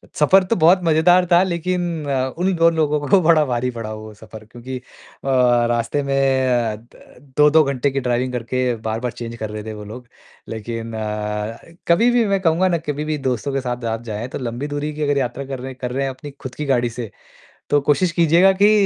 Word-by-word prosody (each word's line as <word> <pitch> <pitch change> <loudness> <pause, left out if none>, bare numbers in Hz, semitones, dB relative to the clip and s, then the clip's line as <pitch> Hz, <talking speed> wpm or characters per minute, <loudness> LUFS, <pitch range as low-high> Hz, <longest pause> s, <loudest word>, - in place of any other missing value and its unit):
सफर 185 +6 +5
तो 185 +5 0
बहुत 175 +1 +5
मज़ेदार 175 +3 +4
था 175 +1 +6
लेकिन 175 -2 -2
अ, 130 -1 -1
उन 185 +2 +1
दोनों 165 0 +3
लोगों 150 -1 +1
को 195 - +5
बड़ा 160 -2 +4
भारी 125 -1 -1
पड़ा 115 -2 -6
वो 110 0 -9
सफर। 110 0 -12
क्योंकि 120 +4 -8
अ, - - -10 0.5
रास्ते 120 +1 +2
में 140 0 -1 0.3
अ, 120 -3 +1 0.6
2-2 150 +1 +6
घंटे 140 -1 0
की 135 - -1
ड्राइविंग 125 0 -1
करके 125 +1 -1
बार-बार 115 +2 -3
चेंज 115 0 -7
कर 110 -1 -5
रहे 105 0 -6
थे 110 0 -6
वो 105 - -8
लोग। 120 +4 -10 0.4
लेकिन 115 +1 -5
अ, 105 0 -3 0.3
कभी 200 +8 +4
भी 240 -1 +3
मैं 200 -1 +1
कहूँगा 175 +1 +2
ना 175 - +1
कभी 150 0 -2
भी 155 -1 -1
दोस्तों 130 +2 -2
के 135 - 0
साथ 125 -1 -4
आप 115 - -4
जाएँ। 110 0 -5
तो - - -6
लंबी 125 +3 -4
दूरी 145 +1 -3
की 155 - -7
अगर 145 -1 +1
यात्रा 130 +1 -2
कर 135 -1 -6
रहे 130 +1 -6
हैं 130 - -13
कर 125 - -3
रहे 135 +2 -1
हैं 135 - -1
अपनी 135 +2 -9
खुद 130 -1 -7
की 150 - -4
गाड़ी 120 -3 +1
से। 115 -2 -7 0.6
तो 145 - +4
कोशिश 150 +5 +1
कीजिएगा 170 +3 +4
कि 210 - +7
130 Hz, 215 wpm, -20 LUFS, 120-160 Hz, 0.6 s, कि